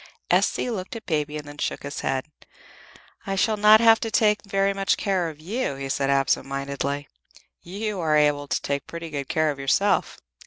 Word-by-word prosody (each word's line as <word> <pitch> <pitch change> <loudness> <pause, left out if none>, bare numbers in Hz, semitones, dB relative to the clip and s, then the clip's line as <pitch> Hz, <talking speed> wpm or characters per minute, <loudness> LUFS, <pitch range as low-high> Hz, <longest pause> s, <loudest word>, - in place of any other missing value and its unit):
S.C. 250 - +2
looked 190 -2 -5
at 230 - -8
Baby 150 -2 -1
and 150 -1 -8
then 145 0 -11
shook - - -3
his 140 0 -5
head. 130 -1 -1 1.0
"I 195 - -1
shall 215 +3 +2
not 210 +1 +7
have 225 -1 +6
to 225 - -3
take 210 -1 +2
very 195 0 +1
much 195 -1 +1
care 185 -4 0
of 155 -2 -11
you," 195 - -3
he 135 0 -6
said, 135 0 0
absent 135 -1 +1
mindedly. 140 +1 -3 0.5
"You 200 +3 -4
are 155 -3 +2
able 145 -1 +2
to - - -1
take 140 0 -2
pretty 170 -1 -7
good 140 -2 -4
care 155 -1 +2
of 140 - -8
yourself." 165 +9 +1
155 Hz, 195 wpm, -24 LUFS, 140-200 Hz, 1.0 s, not